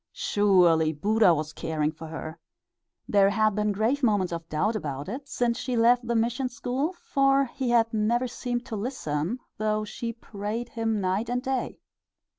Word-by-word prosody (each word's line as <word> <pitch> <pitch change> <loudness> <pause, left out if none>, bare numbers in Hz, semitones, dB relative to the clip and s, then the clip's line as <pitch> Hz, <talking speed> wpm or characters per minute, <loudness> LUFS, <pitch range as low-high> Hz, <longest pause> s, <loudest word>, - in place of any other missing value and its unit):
Surely 175 -6 +3
Buddha 205 +6 +3
was 155 -1 -1
caring 155 -1 -1
for 160 +1 -10
her! 160 0 -7 0.7
There 200 -1 +4
had 215 +1 +2
been 210 +1 0
grave 225 +8 0
moments 205 -8 +2
of 165 -1 -6
doubt 200 +9 0
about 145 -6 -4
it 270 +7 -6
since 240 -2 0
she 255 - -2
left 240 +1 +4
the 235 - 0
mission 240 +3 0
school, 260 +7 -2
for 275 -5 +2
he 255 0 -3
had 230 -1 +3
never 235 +4 +1
seemed 245 0 -4
to 230 - -5
listen, 200 - -2 0.2
though 215 0 0
she 230 +2 -4
prayed 225 +1 -5
him 225 -2 -1
night 195 +5 -1
and 245 +1 -1
day. 265 -1 -2
220 Hz, 170 wpm, -26 LUFS, 185-245 Hz, 0.7 s, There